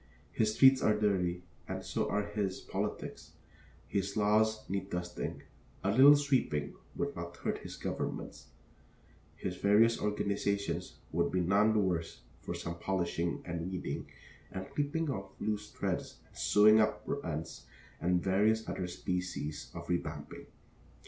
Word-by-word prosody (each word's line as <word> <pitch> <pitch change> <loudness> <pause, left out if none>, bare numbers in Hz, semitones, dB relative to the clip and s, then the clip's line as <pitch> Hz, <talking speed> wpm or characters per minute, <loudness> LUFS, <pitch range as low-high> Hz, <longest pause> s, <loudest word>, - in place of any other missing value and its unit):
His 110 -1 +1
streets 135 -1 +7
are 105 - +4
dirty 90 -4 +1 0.2
and - - -4
so - - -1
are 105 - +1
his 105 -2 -2
politics; - - -4 0.5
his 100 +1 -1
laws 110 +1 +2
need 95 0 -3
dusting; 90 0 -4 0.4
a 100 - +2
little 135 +6 +9
sweeping 130 - +1 0.2
would - - -2
not - - -6
hurt - - -2
his - - -8
governments; - - -4 0.9
his 90 +2 -4
various 110 +4 +4
organizations 100 -3 -1 0.2
would 85 0 +1
be 90 - +1
none 100 +5 +4
the 110 - +3
worse 90 -4 -1 0.2
for 85 - -4
some 85 0 -5
polishing 85 -3 -1
and 85 +1 -3
weeding 95 - -4 0.4
and 95 - -6
clipping 145 +1 0
of 100 -5 -5
loose 105 -1 -2
threads - - -3
and - - -25
sewing 110 +1 +6
up 105 0 +1
of 140 - -2
rents 80 0 -5 0.3
and 90 0 +1
various 105 +4 +2
other 90 - -3
species 90 -4 -3
of 85 0 -6
revamping. 90 -1 -4
100 Hz, 140 wpm, -32 LUFS, 90-110 Hz, 0.9 s, little